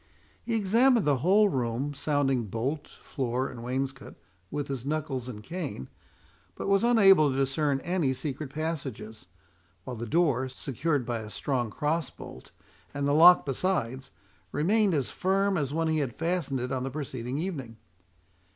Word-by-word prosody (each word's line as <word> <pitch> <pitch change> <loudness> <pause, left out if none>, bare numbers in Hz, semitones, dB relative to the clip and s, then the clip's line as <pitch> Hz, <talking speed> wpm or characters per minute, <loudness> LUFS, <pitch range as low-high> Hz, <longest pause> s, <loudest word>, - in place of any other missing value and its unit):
He 230 - -2
examined 230 +3 +3
the 145 -2 +3
whole 200 +8 +5
room, 130 - -2
sounding 140 -4 0
bolt, 130 +9 -3
floor, 130 -1 -3
and 120 -2 -9
wainscot 135 +2 -4 0.3
with 145 +3 -3
his 135 -4 -4
knuckles 140 -4 -3
and 105 -3 -8
cane, 160 - -5 0.7
but - - -5
was 195 +2 +3
unable 195 -10 +6
to 130 - -2
discern 135 +1 +1
any 175 -6 0
secret 140 +2 -4
passages; 135 - -5 0.6
while 125 - -6
the 120 +1 -5
door, 130 -3 +2
secured 135 +1 -2
by 120 -1 -2
a 110 -1 -8
strong 125 0 -2
cross 155 +8 -1
bolt, - - -12 0.5
and 140 0 -1
the 145 - +2
lock 175 +4 +8
besides, 135 -4 -1 0.4
remained 195 +5 +2
as 135 -4 -1
firm 195 +1 +1
as 145 -5 -1
when 165 +2 0
he 160 -1 +1
had 135 -5 -2
fastened 165 -5 -1
it 125 +1 -4
on 130 -1 -1
the 130 - -2
preceding 130 -3 -4
evening. 145 - -4
140 Hz, 160 wpm, -28 LUFS, 130-165 Hz, 0.7 s, lock